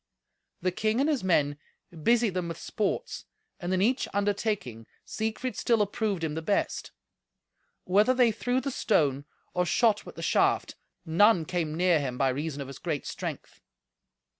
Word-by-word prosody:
The 185 Hz, -, +2 dB
king 215 Hz, +5 st, 0 dB
and 280 Hz, -, +3 dB
his 295 Hz, -8 st, 0 dB
men 145 Hz, -5 st, +2 dB, 0.4 s
busied 230 Hz, +2 st, +3 dB
them 180 Hz, -2 st, -2 dB
with 165 Hz, -1 st, -5 dB
sports, 210 Hz, -, -3 dB, 0.3 s
and 175 Hz, 0 st, -3 dB
in 185 Hz, 0 st, +2 dB
each 250 Hz, +5 st, +1 dB
undertaking 200 Hz, -, -1 dB, 0.2 s
Siegfried 220 Hz, +3 st, -3 dB
still 230 Hz, -2 st, +2 dB
approved 210 Hz, -3 st, -1 dB
him 155 Hz, -2 st, -1 dB
the 160 Hz, -, -3 dB
best. 200 Hz, +5 st, -1 dB, 0.9 s
Whether 210 Hz, +7 st, +3 dB
they 245 Hz, -2 st, +4 dB
threw 245 Hz, +3 st, -1 dB
the 275 Hz, -, -3 dB
stone 145 Hz, -, +1 dB, 0.3 s
or 180 Hz, -, +2 dB
shot 215 Hz, +4 st, +2 dB
with -, -, -11 dB
the -, -, -7 dB
shaft, -, -, +2 dB, 0.3 s
none 175 Hz, +1 st, +4 dB
came 160 Hz, -2 st, -2 dB
near 175 Hz, -1 st, +3 dB
him 130 Hz, -3 st, -3 dB
by 135 Hz, 0 st, +2 dB
reason 145 Hz, +2 st, -3 dB
of -, -, -11 dB
his 135 Hz, 0 st, -9 dB
great 155 Hz, -5 st, -3 dB
strength. -, -, -6 dB
185 Hz, 165 wpm, -28 LUFS, 160-220 Hz, 0.9 s, they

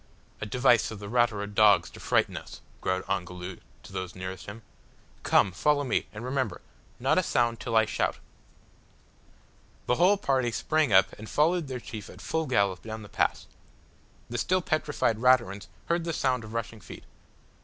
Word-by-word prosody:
"A 110 Hz, -, -3 dB
device 120 Hz, 0 st, +3 dB
of 110 Hz, -, -7 dB
the 100 Hz, 0 st, -8 dB
Ratura 115 Hz, -2 st, +1 dB
dogs 105 Hz, -1 st, +4 dB
to -, -, -12 dB
frighten -, -, +1 dB
us," -, -, -8 dB, 0.2 s
growled 95 Hz, 0 st, -1 dB
Ongoloo 90 Hz, -1 st, -4 dB, 0.3 s
to -, -, -13 dB
those 95 Hz, -1 st, -5 dB
nearest 95 Hz, 0 st, -7 dB
him. 110 Hz, +2 st, -9 dB, 0.6 s
"Come, 95 Hz, -, +3 dB
follow 145 Hz, +10 st, +2 dB
me, 130 Hz, -, 0 dB
and 110 Hz, +3 st, -7 dB
remember, 130 Hz, -3 st, -2 dB, 0.4 s
not -, -, +3 dB
a -, -, +4 dB
sound 120 Hz, -1 st, +1 dB
till 115 Hz, -, -3 dB
I 110 Hz, 0 st, +6 dB
shout." -, -, -1 dB, 1.7 s
The 125 Hz, -, +1 dB
whole 185 Hz, +4 st, +5 dB
party 130 Hz, -9 st, +1 dB
sprang 155 Hz, +2 st, +1 dB
up 95 Hz, -1 st, +5 dB
and 110 Hz, -, -9 dB
followed 165 Hz, +1 st, +2 dB
their 130 Hz, -2 st, -4 dB
chief 110 Hz, -3 st, -8 dB
at -, -, -12 dB
full 160 Hz, -1 st, -2 dB
gallop 100 Hz, -7 st, +1 dB
down 110 Hz, 0 st, -7 dB
the 100 Hz, -, -12 dB
pass. -, -, 0 dB, 0.8 s
The 120 Hz, +1 st, -3 dB
still 185 Hz, -1 st, +1 dB
petrified 150 Hz, -9 st, 0 dB
Raturans 120 Hz, -6 st, +3 dB, 0.2 s
heard 170 Hz, 0 st, 0 dB
the 165 Hz, 0 st, -2 dB
sound 130 Hz, -5 st, 0 dB
of 110 Hz, +1 st, -9 dB
rushing 115 Hz, -1 st, -4 dB
feet. -, -, -11 dB
115 Hz, 175 wpm, -28 LUFS, 100-135 Hz, 1.7 s, I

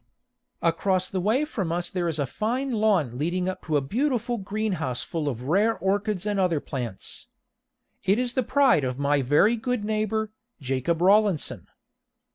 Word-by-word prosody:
Across 185 Hz, +2 st, +1 dB
the 185 Hz, -, -2 dB
way 230 Hz, +10 st, +2 dB
from 195 Hz, -, -3 dB
us 175 Hz, +1 st, -2 dB
there 180 Hz, -3 st, -1 dB
is 160 Hz, -2 st, -1 dB
a 145 Hz, -, 0 dB
fine 245 Hz, -, -2 dB
lawn 195 Hz, -, +1 dB
leading 180 Hz, +4 st, -1 dB
up 185 Hz, -, -3 dB
to 155 Hz, -3 st, +1 dB
a -, -, +1 dB
beautiful 240 Hz, -, -1 dB
greenhouse 195 Hz, -, -2 dB
full 155 Hz, -3 st, -2 dB
of 125 Hz, -2 st, -5 dB
rare 200 Hz, -, +2 dB
orchids 200 Hz, 0 st, -1 dB
and 205 Hz, -1 st, 0 dB
other 180 Hz, -5 st, +2 dB
plants. 125 Hz, -9 st, -6 dB, 0.8 s
It 195 Hz, +3 st, +3 dB
is 245 Hz, 0 st, -1 dB
the 260 Hz, -, +1 dB
pride 260 Hz, -, +3 dB
of 130 Hz, -1 st, -2 dB
my 140 Hz, 0 st, +2 dB
very 150 Hz, -, +4 dB
good 235 Hz, -1 st, -2 dB
neighbor, 215 Hz, 0 st, -1 dB, 0.3 s
Jacob 135 Hz, +5 st, -1 dB
Rawlinson. 200 Hz, -3 st, +2 dB
190 Hz, 165 wpm, -26 LUFS, 150-220 Hz, 0.8 s, very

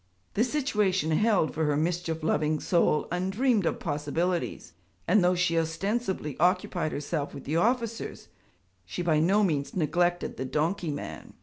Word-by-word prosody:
The 220 Hz, -, +2 dB
situation 210 Hz, -, +1 dB
held 200 Hz, -1 st, +2 dB
for 160 Hz, 0 st, 0 dB
her 150 Hz, -1 st, +1 dB
mischief 165 Hz, 0 st, -1 dB
loving 155 Hz, -1 st, +1 dB
soul 170 Hz, -3 st, +2 dB
undreamed 195 Hz, +3 st, +1 dB
of -, -, -1 dB
possibilities; 160 Hz, -, -2 dB, 0.3 s
and 205 Hz, -, +4 dB
though 180 Hz, +1 st, +3 dB
she 175 Hz, -1 st, +1 dB
ostensibly 165 Hz, -, -2 dB
occupied 180 Hz, -2 st, +1 dB
herself 145 Hz, 0 st, -3 dB
with 135 Hz, -, -8 dB
the 155 Hz, +3 st, -1 dB
officers, 230 Hz, +3 st, -1 dB, 0.6 s
she 95 Hz, -, -5 dB
by 160 Hz, -3 st, +3 dB
no 195 Hz, +6 st, +3 dB
means 150 Hz, -7 st, -1 dB
neglected 175 Hz, +1 st, 0 dB
the 130 Hz, -, -3 dB
donkey 160 Hz, +6 st, -1 dB
man. 145 Hz, -1 st, -6 dB
175 Hz, 145 wpm, -28 LUFS, 155-195 Hz, 0.6 s, and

